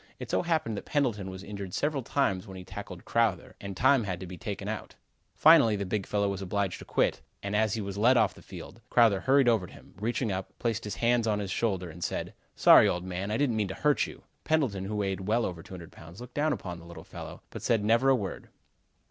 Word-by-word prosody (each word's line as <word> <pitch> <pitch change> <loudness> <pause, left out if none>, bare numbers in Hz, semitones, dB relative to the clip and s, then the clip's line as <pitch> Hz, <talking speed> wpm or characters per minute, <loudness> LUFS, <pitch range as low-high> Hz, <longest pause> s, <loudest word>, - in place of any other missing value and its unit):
It - - -7
so - - +2
happened 160 - -1
that - - -6
Pendleton 115 -10 0
was 95 0 -8
injured 100 -3 -6
several 145 -1 0
times 110 -7 0
when 95 -1 -9
he 90 - -8
tackled - - -8
Crowther 110 -7 0
and 100 -2 -6
time 130 0 +4
had 95 -4 -3
to 95 - -6
be 90 0 -8
taken 100 0 -5
out. 110 -1 -5 0.4
Finally 150 -9 +6
the 100 -1 -3
big 95 +1 -2
fellow 100 -1 +1
was 100 -1 -3
obliged 95 -1 -2
to - - -10
quit, - - +1 0.2
and 100 +1 -2
as 110 0 +2
he 110 - -2
was 100 0 -5
led 125 +4 +5
off 110 -3 +3
the - - -15
field, 115 - -11
Crowther 115 -5 +5
hurried 135 +2 +4
over 110 -6 +3
to - - -15
him, - - -16
reaching 115 +1 -1
up, 95 0 -5
placed 115 -2 -2
his 105 -1 -4
hands 120 -1 +2
on 105 -1 +2
his 100 -2 -4
shoulder 95 -4 -1
and 85 +1 -8
said: - - -3 0.2
"Sorry, - - +7
old 90 0 -2
man! 95 +2 -4
I 110 - 0
didn't 135 -6 +1
mean 105 -2 +1
to 95 - -6
hurt 150 -1 +2
you." - - -12 0.2
Pendleton, 130 -12 0
who 105 +2 -4
weighed 95 -2 -2
well 115 +2 +2
over 85 -3 -5
200 90 -2 -10
pounds, 85 +3 -13
looked 125 0 -10
down 155 +1 +1
upon 90 -11 -4
the 85 - -13
little 85 0 -10
fellow, - - -9
but - - -7
said 110 -3 +1
never 115 +5 +4
a 135 - +6
word. 100 -6 -5
105 Hz, 245 wpm, -29 LUFS, 95-120 Hz, 0.4 s, Sorry